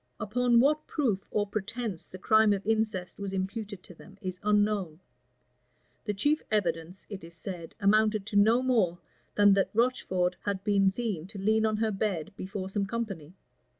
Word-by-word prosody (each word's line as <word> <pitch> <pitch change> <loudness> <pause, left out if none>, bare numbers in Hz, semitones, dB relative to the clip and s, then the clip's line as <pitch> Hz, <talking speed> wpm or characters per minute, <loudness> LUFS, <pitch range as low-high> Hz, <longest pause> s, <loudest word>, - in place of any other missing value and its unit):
Upon 240 +2 +2
what 300 +4 +2
proof 220 -11 -1
or 210 -1 0
pretence 215 -1 -4
the 185 - -10
crime 215 +2 +4
of 200 -1 -4
incest 215 -5 -1
was 200 -1 -4
imputed 195 0 -4
to - - -13
them, 195 +3 -16
is 185 -1 -5
unknown: 205 -6 +1 1.1
the 210 - -1
chief 290 +10 +1
evidence, 175 -3 -1
it 200 -4 -8
is 170 0 -11
said, 170 -1 -7
amounted 215 0 +3
to 215 0 -6
no 220 +5 +5
more 215 -10 +2 0.4
than 205 -1 +6
that 195 -1 +1
Rocheford 185 -7 +1
had 200 -2 -2
been 200 -2 +3
seen 190 -5 -3
to 200 +1 -10
lean 220 +3 +2
on 215 -1 0
her 220 0 +1
bed 195 -3 -2
before 190 0 -5
some 195 0 -2
company. 195 -8 -5
205 Hz, 170 wpm, -29 LUFS, 190-220 Hz, 1.1 s, than